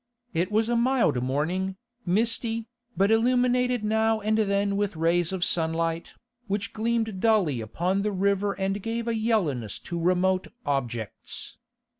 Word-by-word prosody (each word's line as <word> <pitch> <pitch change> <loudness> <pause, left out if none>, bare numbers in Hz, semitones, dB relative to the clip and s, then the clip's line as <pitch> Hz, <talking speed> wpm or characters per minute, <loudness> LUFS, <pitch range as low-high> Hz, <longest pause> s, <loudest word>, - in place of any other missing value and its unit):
It 175 +4 0
was 220 +1 +2
a 240 - +1
mild 235 - +2
morning, 165 +9 -1 0.3
misty, 225 +3 0 0.3
but 195 +2 +3
illuminated 250 +1 +2
now 220 +1 +2
and 215 +1 +1
then 200 -2 +1
with 205 -2 -1
rays 170 +2 +1
of 190 -2 -1
sunlight, 165 0 0 0.3
which 205 +2 -2
gleamed 225 -2 -1
dully 185 - +2
upon 175 - -1
the 210 +1 0
river 200 +1 +1
and 195 +1 -2
gave 230 +2 -3
a 235 - +1
yellowness 185 - 0
to 170 - -5
remote 185 +2 +2 0.2
objects. 120 -6 -3
200 Hz, 140 wpm, -26 LUFS, 170-225 Hz, 0.3 s, but